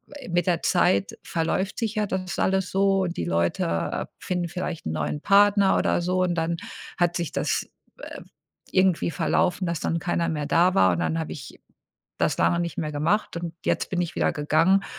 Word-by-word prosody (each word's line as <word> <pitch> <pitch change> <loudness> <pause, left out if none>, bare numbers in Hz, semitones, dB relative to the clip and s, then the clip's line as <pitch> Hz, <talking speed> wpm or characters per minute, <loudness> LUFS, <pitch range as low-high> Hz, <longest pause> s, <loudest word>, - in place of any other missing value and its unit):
äh, 285 - -9
mit 175 +2 0
der 175 -2 +1
Zeit 180 +2 +2
verläuft 170 +4 -1
sich 225 -2 -2
ja 210 -1 +1
das 185 -2 -3
alles 190 -1 +1
so 195 0 +2
und 175 -1 -4
die 85 - -2
Leute 85 0 -1
finden 180 -1 -2
vielleicht 180 -2 -5
'n 80 - -2
neuen 80 - -2
Partner 200 0 +5
oder - - +1
so 185 +1 0
und 175 -1 +1
dann 165 0 0 0.4
hat 175 0 +1
sich 170 -2 -3
das, - - -1 0.3
äh, - - -8 0.5
irgendwie 185 -3 +2
verlaufen, 180 +2 0
dass 170 -1 -2
dann 165 - -1
keiner 170 -1 -1
mehr 150 -2 -2
da 175 +4 +3
war 95 -1 +5
und 85 - -2
dann 160 - 0
habe 160 - -4
ich 135 - -10 0.6
das - - +1
lange 170 - +2
nicht 170 -1 -4
mehr 155 -1 -2
gemacht 170 +6 0
und 170 -1 -4
jetzt - - 0
bin 180 - -1
ich 170 - -5
wieder - - +1
gegangen 165 +6 +2
175 Hz, 195 wpm, -25 LUFS, 160-190 Hz, 0.6 s, Partner